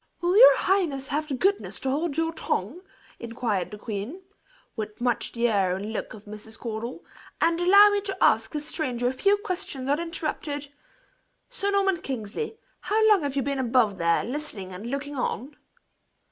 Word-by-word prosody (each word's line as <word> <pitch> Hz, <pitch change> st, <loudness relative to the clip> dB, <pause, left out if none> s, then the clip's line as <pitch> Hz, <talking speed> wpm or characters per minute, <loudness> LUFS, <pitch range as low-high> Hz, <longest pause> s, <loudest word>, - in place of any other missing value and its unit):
"Will 350 Hz, +2 st, +1 dB
your -, -, +9 dB
highness 315 Hz, -9 st, 0 dB
have 305 Hz, +2 st, -1 dB
the 280 Hz, -, -2 dB
goodness 390 Hz, +9 st, 0 dB
to 265 Hz, -, 0 dB
hold 300 Hz, +1 st, -1 dB
your 325 Hz, 0 st, 0 dB
tongue?" 280 Hz, -, -2 dB, 0.4 s
inquired 230 Hz, -5 st, -2 dB
the 210 Hz, -, -8 dB
queen, 220 Hz, -, -6 dB, 0.5 s
with 215 Hz, -1 st, -6 dB
much 240 Hz, -1 st, 0 dB
the 235 Hz, 0 st, +1 dB
air 195 Hz, -5 st, +2 dB
and 205 Hz, +3 st, -5 dB
look 220 Hz, -, -4 dB
of 210 Hz, -, -14 dB
Mrs. 215 Hz, +1 st, -9 dB
Caudle, 235 Hz, +5 st, -6 dB, 0.3 s
"and 335 Hz, +1 st, +2 dB
allow 400 Hz, +4 st, +8 dB
me 410 Hz, 0 st, +1 dB
to 390 Hz, -1 st, -4 dB
ask 220 Hz, 0 st, +3 dB
this 300 Hz, -1 st, -4 dB
stranger 255 Hz, -6 st, -2 dB
a 250 Hz, -, 0 dB
few 400 Hz, +10 st, +3 dB
questions 365 Hz, -, -3 dB
uninterrupted? 300 Hz, -2 st, -2 dB, 0.8 s
Sir 405 Hz, -5 st, -1 dB
Norman 390 Hz, -3 st, +2 dB
Kingsley, 265 Hz, -, -4 dB, 0.2 s
how 440 Hz, +1 st, +2 dB
long 410 Hz, -4 st, +5 dB
have 285 Hz, -2 st, -3 dB
you 275 Hz, -, +1 dB
been 280 Hz, +1 st, -2 dB
above 235 Hz, -5 st, +2 dB
there, 170 Hz, 0 st, +2 dB
listening 240 Hz, -8 st, -5 dB
and 205 Hz, +6 st, -7 dB
looking 280 Hz, +2 st, -4 dB
on?" 265 Hz, +2 st, -3 dB
275 Hz, 175 wpm, -26 LUFS, 225-350 Hz, 0.8 s, your